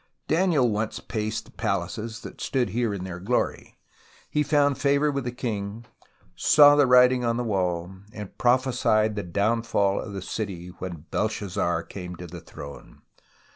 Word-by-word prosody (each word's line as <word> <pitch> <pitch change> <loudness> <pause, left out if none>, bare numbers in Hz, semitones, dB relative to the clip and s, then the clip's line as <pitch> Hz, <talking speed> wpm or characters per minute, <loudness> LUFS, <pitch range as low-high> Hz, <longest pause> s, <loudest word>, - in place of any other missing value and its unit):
Daniel 160 -6 +3
once 110 0 -2
paced 110 -1 -3
the - - -17
palaces 110 0 -3
that - - -10
stood 130 -3 0
here 120 -1 0
in 100 -3 -4
their 90 -2 -6
glory, 110 +7 -2 0.7
found 145 -2 +2
favour 140 +1 +2
with 140 -2 -3
the 120 - -2
king, 115 -3 -4 0.5
saw 145 -1 +7
the 145 -2 +4
writing 125 0 +6
on 115 -1 +1
the 125 - -1
wall 90 -4 -1 0.2
and 105 -3 -9
prophesied 120 -4 +2
the 105 - -2
downfall 100 +1 +1
of 105 - -8
the 95 - -5
city 95 -5 -5
when 85 -4 -6
Belshazzar 95 -5 -1
came 90 -1 -8
to 90 - -9
the 85 0 -9
throne. 70 -2 -11
110 Hz, 155 wpm, -25 LUFS, 95-125 Hz, 0.7 s, saw